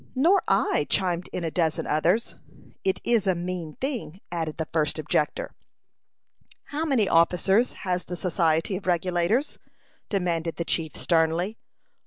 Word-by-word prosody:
"Nor 340 +10 +4
I," - - +2
chimed 180 -2 0
in 180 - -3
a 165 - -2
dozen 160 -2 0
others. 175 +9 +1 0.5
"It 190 - +1
is 230 -4 +2
a 190 - +3
mean 175 -3 -4
thing," 250 - -4
added 160 -3 -3
the 160 -1 -3
first 155 -2 +1
objector. 150 -1 -1 1.1
"How 305 +3 -3
many 255 -10 +2
officers 185 +7 +3
has 180 -2 -2
the 180 - -5
Society 165 0 +1
of 190 0 -6
Regulators?" 180 - +1 0.5
demanded 170 -5 -1
the 170 - -3
chief, 160 -2 -1
sternly. 170 +5 +1
180 Hz, 140 wpm, -26 LUFS, 165-200 Hz, 1.1 s, Nor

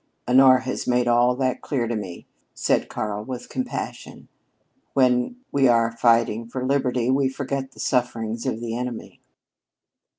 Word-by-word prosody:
"Honora 130 0 +6
has 130 - -4
made 125 0 +2
all 120 +1 +4
that 130 -1 -1
clear 125 -5 -2
to 120 - -2
me," 95 -5 -6 0.3
said - - 0
Karl 105 -1 -3
with 125 +1 -7
compassion. 255 -1 -5 0.7
"When 125 - +2 0.2
we 135 -1 +3
are 115 -1 +3
fighting 115 -1 +2
for 130 +2 -4
liberty 130 -2 +1
we 135 0 +2
forget 135 0 -4
the - - -17
sufferings 115 -3 -1
of 110 - -2
the 115 -1 -3
enemy." 125 -1 -6
125 Hz, 145 wpm, -23 LUFS, 115-130 Hz, 0.7 s, Honora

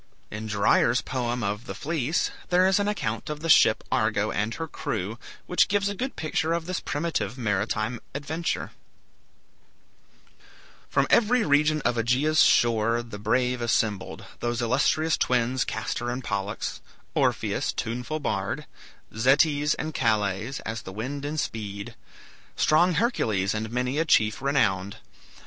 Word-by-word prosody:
In 110 +1 -5
Dyer's 110 +3 +3
poem 120 -2 -2
of 105 +4 -3
"The - - -5
Fleece" 155 0 -1 0.2
there 180 +1 +4
is 190 +1 +3
an 205 - 0
account 115 - -2
of 150 0 -5
the 165 - -3
ship - - +6
"Argo" - - +1
and 105 +3 -1
her 165 - -4
crew, 110 -5 -4 0.3
which 180 - +3
gives 200 0 +1
a - - -2
good 260 +6 -4
picture 160 +1 -1
of 170 -1 -2
this 185 +1 -2
primitive 145 -8 -2
maritime 110 +1 -1 0.2
adventure: 155 +4 -3 2.2
"From - - +2
every 240 +1 +4
region 150 0 +3
of 120 -1 +1
Aegea's 135 +7 +3
shore 115 0 +3
The 115 -3 -9
brave 125 +3 +1
assembled; 110 -4 -1
those 120 -1 -2
illustrious 140 +6 +2
twins 125 +1 +1
Castor 120 0 -3
and 125 +2 -4
Pollux; 100 -1 -3 0.3
Orpheus, - - 0
tuneful 125 +7 -3
bard; 145 - -2 0.5
Zetes 145 +5 +3
and 155 0 -4
Calais, 110 -1 0
as 115 0 -4
the 95 - -9
wind 130 +8 -5
in 150 +2 -3
speed; 100 -7 -4 0.6
Strong 175 +3 +3
Hercules 110 - +1
and 110 +1 -3
many 125 +4 -1
a 165 - +2
chief 110 -8 +3
renowned. 100 -9 +1
125 Hz, 140 wpm, -26 LUFS, 110-155 Hz, 2.2 s, ship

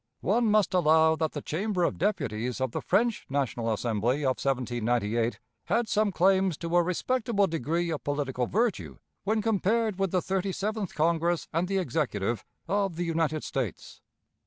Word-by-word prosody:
One 225 +3 +2
must 210 -3 +3
allow 160 -2 +4
that 160 -1 -1
the 145 - -5
Chamber 185 +3 -1
of - - 0
Deputies 125 - -1
of 130 -2 -1
the - - -3
French 230 +1 +1
National 125 -4 -1
Assembly 120 +5 0
of 130 -2 +1
1798 120 -3 0 0.3
had 235 -1 +1
some 215 -1 +2
claims 190 -2 +3
to 170 0 -3
a 175 - +6
respectable 205 +4 +1
degree 165 +1 -1
of 155 - -4
political 135 -4 -1
virtue 225 +2 -1 0.3
when 215 +1 +1
compared 220 -1 +1
with 195 -1 +1
the 185 - +1
Thirty 190 0 -1
seventh 210 -1 -3
Congress 170 +2 +1
and 170 +3 +1
the 195 +1 0
Executive 120 - -1 0.2
of 195 -1 0
the 175 +1 -2
United 160 -2 0
States. 125 -9 -4
165 Hz, 160 wpm, -28 LUFS, 135-195 Hz, 0.3 s, a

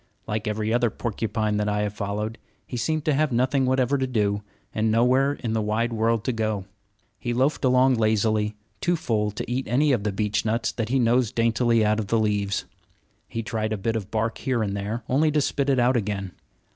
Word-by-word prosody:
Like 105 0 -3
every 110 +1 -1
other 120 -1 +3
porcupine 110 -1 -2
that 105 0 0
I 105 0 0
have 105 -1 -2
followed, 105 +2 -3 0.3
he - - -7
seemed 150 +6 -1
to 155 - +3
have 150 +1 +1
nothing 130 +2 +2
whatever 130 +1 +2
to 130 - 0
do, 105 -4 0 0.3
and 110 +1 +1
nowhere 130 +5 +3
in 115 -5 -4
the 110 - +1
wide 110 +3 0
world 115 0 +1
to - - 0
go. 110 -4 -2 0.5
He 120 -1 -2
loafed 135 +5 +1
along 130 0 +4
lazily, 110 -1 +1 0.2
too 175 -1 +1
full 110 -10 0
to 105 - -5
eat 130 +2 -1
any 140 +6 +3
of 120 -6 +1
the 105 - 0
beechnuts 110 +3 0
that 115 -2 -3
he 135 - +2
nosed 120 -1 +2
daintily 115 0 +3
out 105 +1 +2
of 105 - -3
the 115 - +2
leaves. 105 -2 0 0.6
He 115 - -4
tried 110 -1 -2
a - - -2
bit 110 +3 -1
of 105 -3 -3
bark 110 +1 -1
here 125 -4 0
and 100 -1 -2
there, 105 +4 -3
only 150 +5 +3
to 150 0 +2
spit 140 0 0
it 135 - +3
out 125 +1 +3
again. 100 -4 -2
115 Hz, 210 wpm, -25 LUFS, 105-125 Hz, 0.6 s, along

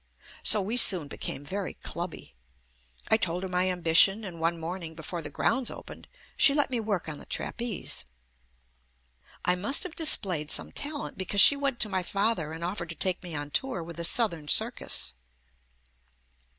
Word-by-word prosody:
So 210 - +5
we 220 +6 -2
soon 180 -10 +7
become 145 0 -6
very 195 +5 -5
clubby. 170 - -7 0.8
I 220 - +5
told 180 -3 -2
her - - -3
my 180 0 0
ambi 175 -3 -2
tion, 195 +5 +5
and 175 -5 -8
one 165 +1 -1
morning 165 0 -6
before 165 +2 -6
the - - -7
grounds 260 -2 -1
opened - - -11 0.3
she 280 - +4
let 290 -2 +1
me 245 - 0
work 210 -6 -3
on 150 -2 -6
the - - -12
trapeze. 235 -5 -3 1.4
I 180 - +4
must 205 - +3
have 365 -4 -7
displayed 185 - +3
some - - 0
talent 290 -6 -5
because 195 +2 -1
she 285 - +9
went 275 -3 -2
to 215 - +2
my 190 -2 -1
father 195 -4 -1
and 165 +1 -7
offered 175 -1 -4
to 165 - -7
take 185 +3 -1
me 175 -3 -7
on 145 0 -5
tour 245 - -1
with 170 0 -10
a - - -3
southern 170 -5 +2
circus. - - +1
185 Hz, 175 wpm, -27 LUFS, 165-220 Hz, 1.4 s, she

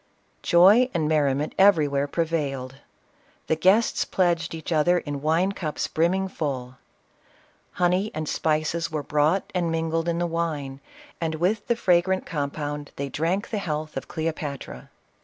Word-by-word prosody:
Joy 200 +9 +6
and 160 -3 +1
merriment 150 -1 +1
everywhere 150 -8 +4
prevailed. 140 -5 -2 0.7
The 160 - +1
guests 200 +7 +3
pledged 170 -3 0
each 160 +1 -7
other 165 +3 +3
in 145 -4 -4
wine 165 +6 +2
cups 160 -6 -3
brimming 185 +4 +1
full. 130 -8 -4 1.0
Honey 180 +4 +1
and 155 -1 -3
spices 160 +2 0
were 155 -2 -3
brought 150 +7 +1
and 175 -3 0
mingled 165 +1 -1
in 170 - 0
the 175 - 0
wine, 155 -5 -3 0.4
and 160 -1 -1
with 190 +7 0
the 235 - +2
fragrant 185 -3 +2
compound 145 -1 -4
they 140 0 -4
drank 170 +8 -1
the 220 - -1
38 - - -6
CLEOPATRA. - - -7
health 155 0 -6
of - - -5
Cleopatra. 150 - -5
160 Hz, 150 wpm, -25 LUFS, 145-175 Hz, 1.0 s, Joy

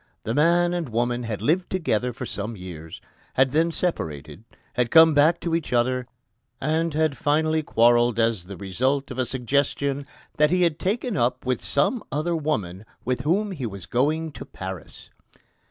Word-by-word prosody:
The 115 - -2
man 175 +5 +3
and 170 -6 -2
woman 120 +2 0
had 115 -3 -4
lived 175 +5 +1
together 125 - 0
for 130 +2 -6
some 110 0 -5
years, 80 -3 -9 0.3
had 130 0 +3
then 165 +3 +2
separated, 80 - -3 0.3
had 125 -1 0
come 160 +2 +7
back 155 +4 +4
to 170 - -2
each 165 -2 -1
other, 125 +1 +1 0.5
and 160 +3 0
had 155 -2 +1
finally 155 +3 +1
quarrelled 120 -3 +3
as 115 -5 +1
the 100 0 -9
result 130 +9 -1
of 130 - -6
a 130 - +2
suggestion 140 +2 -1 0.3
"that 150 0 +4
he 180 +2 +2
had 165 -2 +1
taken 225 +4 -1
up 125 +1 0
with 125 -2 -1
some 180 - 0
other 155 +4 -1
woman, 105 - -2 0.2
with 125 0 -1
whom 200 +7 +1
he 140 -10 -4
was 100 -4 -8
going 155 +7 0
to - - -9
Paris." 95 -1 -9
135 Hz, 170 wpm, -24 LUFS, 115-160 Hz, 0.5 s, come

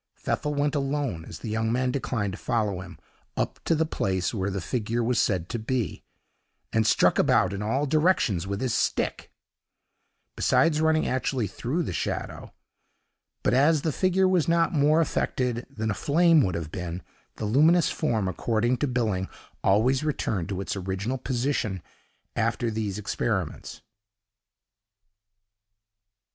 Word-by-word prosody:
Pfeffel 150 0 -2
went 145 0 +1
alone, 135 - -2
as - - -8
the 115 - -7
young 110 +1 0
man 125 +1 +1
declined 115 -7 -2
to 100 - -8
follow 105 -5 -1
him, 95 -2 -10 0.4
up - - -2
to 165 - +3
the 160 +1 +1
place 95 - -1
where 100 -3 -1
the 100 0 -3
figure 115 +4 -2
was 120 +1 +1
said 90 -4 0
to 120 - -3
be, 120 +1 -2 0.7
and 110 -1 +2
struck - - +4
about - - +3
in 100 - -4
all 130 +7 0
directions 150 - +2
with 100 0 -3
his 130 -3 0
stick, - - -1 1.0
besides 155 -2 +3
running 160 0 +3
actually 130 -2 0
through 125 - -2
the 90 - -4
shadow; - - -4 0.9
but - - +2 0.3
the 160 - +1
figure 185 +4 +2
was 185 -4 +2
not 170 0 +2
more 155 +2 +4
affected 125 -6 -1
than 110 -1 -3
a - - 0
flame 165 - +4
would 90 -8 0
have 80 -2 -4
been; 90 -2 -5 0.3
the 110 - -4
luminous 155 +9 +4
form, 110 -10 0
according 115 +6 0
to 145 - 0
Billing 110 -7 -1 0.3
always 125 +8 +3
returned 105 - -1
to 95 -1 -3
its 100 - -3
original 100 +7 -3
position 125 -6 -1 0.6
after 120 -1 0
these 105 -3 -3
experiments. 100 -4 -3
120 Hz, 150 wpm, -26 LUFS, 100-145 Hz, 1.0 s, struck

